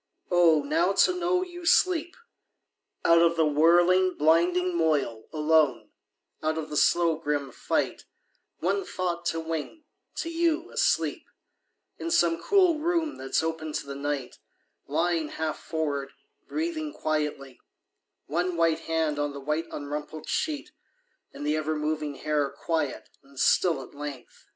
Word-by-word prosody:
Oh, 165 -4 +5
now 165 +6 +1
to 360 - +4
know 360 +1 +1
you 350 -1 -9
sleep! 345 -1 +2 0.9
Out 170 0 +6
of 170 0 +4
the 160 -1 +3
whirling 175 +5 +4
blinding 175 +3 +3
moil, 150 -9 0
alone, 155 -3 +2 0.5
Out 155 +1 -1
of 155 -1 -5
the - - -4
slow 165 +1 +3
grim 145 -3 -2
fight, - - -2 0.5
One 195 +3 0
thought 175 -2 -3
to 165 - 0
wing 165 - -5 0.3
to 330 - -3
you, 335 0 0
asleep, 485 +1 0 0.7
In 335 - -3
some 170 - +2
cool 370 -6 +3
room 330 -1 0
that's 135 +4 -1
open 160 -1 -3
to - - -3
the 140 - -6
night 140 -2 -4 0.5
Lying 165 +2 0
half 155 0 -3
forward, 140 -4 -3 0.3
breathing 315 -1 -3
quietly, 150 - -3 0.7
One 175 +4 -1
white 165 -1 +2
hand 160 -3 -1
on 145 -1 -1
the 140 - -7
white 150 +4 -2
Unrumpled 150 +2 -6
sheet, 300 -3 -2 0.6
and 145 - -7
the 150 +1 +1
ever 155 0 -1
moving 150 -1 -2
hair 145 0 0
Quiet 160 -4 -3
and 135 -1 -14
still 175 +3 +3
at - - -14
length! 145 -3 -9
160 Hz, 140 wpm, -27 LUFS, 150-185 Hz, 0.9 s, Out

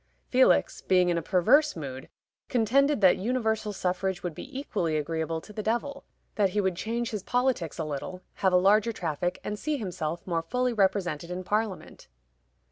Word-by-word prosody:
Felix, 260 0 +3
being 180 -1 +3
in 170 - +1
a - - -5
perverse 220 - +3
mood, 135 -5 -7 0.4
contended 270 +3 +2
that 185 -2 +6
universal 220 -1 -1
suffrage 185 -1 -2
would 175 -2 -3
be 260 - -7
equally 175 - -1
agreeable 160 +1 -2
to 210 - -13
the 215 - -4
devil; 240 +6 -2 0.3
that 200 -2 +2
he 205 +3 -1
would 190 -3 +1
change 230 +5 -3
his 210 -3 -3
politics 245 - 0
a 160 - -2
little, 155 +5 -5
have 190 - +1
a 180 - +5
larger 205 +5 +4
traffic, 175 -3 -3
and 210 0 -4
see 305 -1 -1
himself 175 - -4
more 170 -3 -1
fully 250 +9 -1
represented 185 -6 0
in 180 +1 -4
Parliament. 210 0 -3
190 Hz, 175 wpm, -27 LUFS, 175-225 Hz, 0.4 s, that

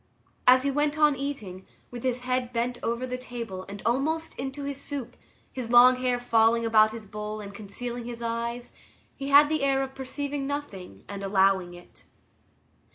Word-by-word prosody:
As 255 +1 +7
he 280 - +1
went 295 +2 0
on 300 -2 +4
eating, 220 -10 -6 0.2
with 245 -1 -7
his 250 -1 -1
head 250 -1 -1
bent 245 +1 -2
over 235 +2 -2
the 250 0 -4
table 230 -7 -6
and 200 0 -8
almost 305 +7 0
into 270 +2 -4
his 280 0 -4
soup, 265 -5 -5 0.4
his 250 -3 -4
long 250 +1 +8
hair 250 -1 0
falling 230 -1 +3
about 215 -1 +5
his 225 -1 -7
bowl 210 +1 -6
and 200 -1 -8
concealing 235 +4 -6
his 235 -1 -6
eyes, 235 +1 -3 0.4
he 275 - -6
had 285 +1 +7
the 310 0 0
air 270 -1 +2
of 265 0 -6
perceiving 275 +1 -4
nothing 195 - -6
and 200 0 -6
allowing 190 -2 +2
it. 175 - -15
245 Hz, 175 wpm, -27 LUFS, 220-275 Hz, 0.4 s, long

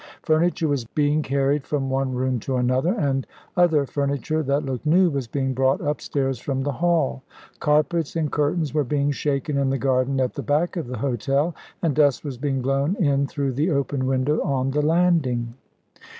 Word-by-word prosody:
Furniture 165 +1 +2
was 140 -4 0
being 145 +5 0
carried 140 0 0
from 140 -2 -2
one 135 -1 -1
room 130 0 0
to 130 +4 -3
another, 130 +6 +1
and 135 -3 -1 0.3
other 160 -5 +3
furniture, 140 +3 -1
that 140 0 0
looked 130 -3 -4
new, 175 +3 +4
was 135 -4 -3
being 135 +2 -1
brought 130 +1 +2
upstairs 140 -3 -2
from 135 +1 -2
the 145 - -1
hall. 165 - 0 0.4
Carpets 155 +2 +1
and 155 -3 -1
curtains 150 +1 0
were 150 -1 +2
being 145 +1 0
shaken 140 0 -1
in 135 -1 +1
the 135 - 0
garden 130 0 +1
at 130 -1 0
the - - -4
back 155 +6 0
of 165 -7 -3
the 125 0 -5
hotel, 140 +5 0 0.3
and 165 -4 +2
dust 145 -3 +3
was 135 -4 -5
being 135 -2 -1
blown 140 +7 +1
in 140 -7 +1
through 140 -1 -2
the 145 +7 0
open 140 -3 -1
window 135 +3 +1
on 135 -1 0
the 150 +2 +1
landing. 150 -8 +1
140 Hz, 185 wpm, -23 LUFS, 130-150 Hz, 0.4 s, new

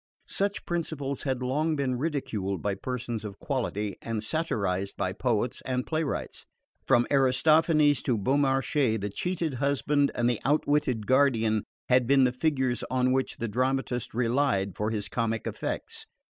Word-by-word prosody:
Such 200 +1 -1
principles 150 -6 -3
had 130 -2 -2
long 155 +5 0
been 135 -3 0
ridiculed 120 - -2
by 100 - 0
persons 120 +1 -4
of 100 -2 -7
quality 105 -7 -2
and 115 -2 -3
satirised 100 - -1
by 95 - -1
poets 120 +1 -1
and 125 -1 -2
playwrights. 155 -2 -3 0.4
From 120 0 +4
Aristophanes 145 +2 +4
to 120 -4 0
Beaumarchais 135 0 +1
the 100 -1 -4
cheated 175 - -2
husband 140 +2 +1
and 120 - +1
the 120 -3 0
outwitted 145 -5 +1
guardian 115 -5 +3 0.2
had 125 -1 +3
been 135 0 +5
the 125 - +3
figures 130 -3 0
on 130 0 +2
which 130 0 0
the 115 - -2
dramatist 125 +1 -1
relied 115 -6 +1
for 105 +1 -1
his 105 -2 -3
comic 115 0 -2
effects. - - -4
130 Hz, 145 wpm, -28 LUFS, 110-140 Hz, 0.4 s, been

